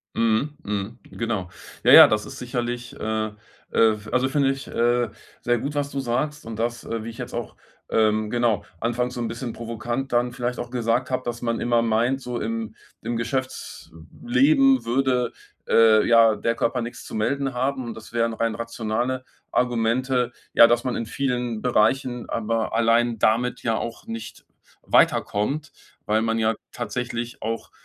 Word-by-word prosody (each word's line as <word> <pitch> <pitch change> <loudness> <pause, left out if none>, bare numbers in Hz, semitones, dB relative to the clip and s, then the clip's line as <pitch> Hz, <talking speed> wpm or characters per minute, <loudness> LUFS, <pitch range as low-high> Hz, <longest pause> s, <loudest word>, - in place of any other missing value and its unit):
Mhm. 115 +6 +1
Mhm 105 +3 -3
genau. 110 -6 -3 0.4
Ja, - - +6
ja, - - +11
das 105 0 0
ist - - -9
sicherlich 120 -1 -4
äh, 110 0 -1
äh, - - -10 0.4
w 110 -2 +2
also, 130 +1 +2
finde 135 0 +2
ich, 135 0 -4
äh, 120 0 +1 0.3
sehr 120 0 +1
gut, 145 +5 -4
was 140 -1 -1
du 140 - -2
sagst 135 +5 -2
und 115 -1 -6
das, 120 +1 -2
äh, 115 -1 -4
wie 115 - -5
ich 115 - -12
jetzt 125 0 -6
auch 120 -2 -5 0.3
ähm, 110 -1 +2
genau, 120 -3 +1 0.2
anfangs 120 +2 -1
so 125 - -4
'n 115 - -1
bisschen 120 +1 -5
provokant 120 +3 -4
dann 120 0 +2
vielleicht 125 0 -3
auch 120 - -5
gesagt 120 +1 0
habe, 130 0 -1
dass 120 0 -4
man 115 -1 -1
immer 120 -1 +2
meint, 115 +4 +1
so 125 -2 -4
im 115 0 -3 0.3
im 120 +1 -2
Geschäftsleben 235 - 0
würde, 125 0 +1 0.4
äh, 110 -1 +6
ja, 115 -1 +6
der 115 +3 0
Körper 120 +1 0
nix 120 +1 -7
zu - - -9
melden 135 +5 -1
haben 130 +1 -1
und 115 -1 -5
das 110 +1 -12
wären 115 -1 +1
rein 115 0 -1
rationale 115 +2 -2 0.3
Argumente, 125 +1 +1 0.2
ja, 115 - +9
dass 120 0 +2
man 125 -2 -1
in 115 - -3
vielen 125 -3 -2
Bereichen 125 +1 +1
aber 115 0 -1
allein 115 0 +3
damit 115 +4 +1
ja 115 -1 +1
auch 115 +1 -5
nicht 115 0 -7 0.4
weiterkommt, 140 +9 +1 0.4
weil 110 +1 +2
man 115 0 0
ja 110 0 +2 0.2
tatsächlich 120 -1 -4
auch, 115 +1 -4
120 Hz, 170 wpm, -24 LUFS, 115-125 Hz, 0.4 s, ja